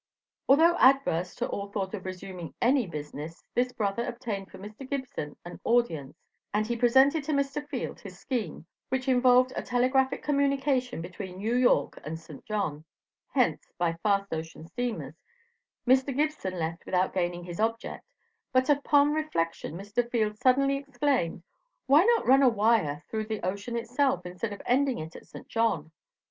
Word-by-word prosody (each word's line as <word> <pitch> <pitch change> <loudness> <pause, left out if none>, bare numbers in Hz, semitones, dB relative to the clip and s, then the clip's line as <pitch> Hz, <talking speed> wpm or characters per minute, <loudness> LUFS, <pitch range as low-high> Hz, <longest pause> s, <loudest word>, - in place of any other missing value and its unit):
Although 325 +5 +6
adverse 255 -10 +3
to - - -2
all 200 0 -3
thought 200 -1 -3
of 195 -3 -5
resuming 185 -2 -7
any 250 -2 +3
business 150 +1 -7
this 250 +1 +1
brother 225 -2 -1
obtained 225 -6 -4
for - - -12
Mr. 215 +7 -10
Gibson 260 - -4
an 175 - -9
audience, 165 - +1 0.3
and 210 +1 +1
he 235 +2 -1
presented 265 +6 +4
to 310 - -1
Mr. 280 +1 0
Field - - -4
his - - -10
scheme 235 - -4 0.2
which 260 0 -1
involved 255 0 +5
a - - -1
telegraphic 255 +2 +1
communication 275 - +1
between 185 +1 -7
New 220 +5 -1
York 245 - +3
and 160 +2 -5
St. 155 -3 -12
John; 195 -9 -2 0.5
hence, - - +1
by 170 -1 +1
fast 200 -2 +1
ocean 160 0 -6
steamers, 220 - -4 0.7
Mr. 260 +1 +3
Gibson 295 -12 -1
left 165 0 -3
without 185 0 +1
gaining 175 -1 -1
his 175 -1 -7
object, 225 +1 -2 0.4
but 260 +2 +3
upon 290 0 +4
reflection 165 - -2
Mr. 205 +6 -2
Field 215 -3 0
suddenly 275 +2 +3
exclaimed: 270 - -1 0.4
"Why 295 +7 +6
not 470 0 +3
run 265 +2 +6
a 265 - +7
wire 210 -10 +2
through 220 -1 -3
the 215 -4 -3
ocean 200 +6 -3
itself, 250 +3 0
instead 180 +5 -4
of 205 - -8
ending 265 0 +2
it 160 +2 -7
at - - -12
St. - - -11
John?" 220 -9 0
230 Hz, 160 wpm, -28 LUFS, 180-265 Hz, 0.7 s, a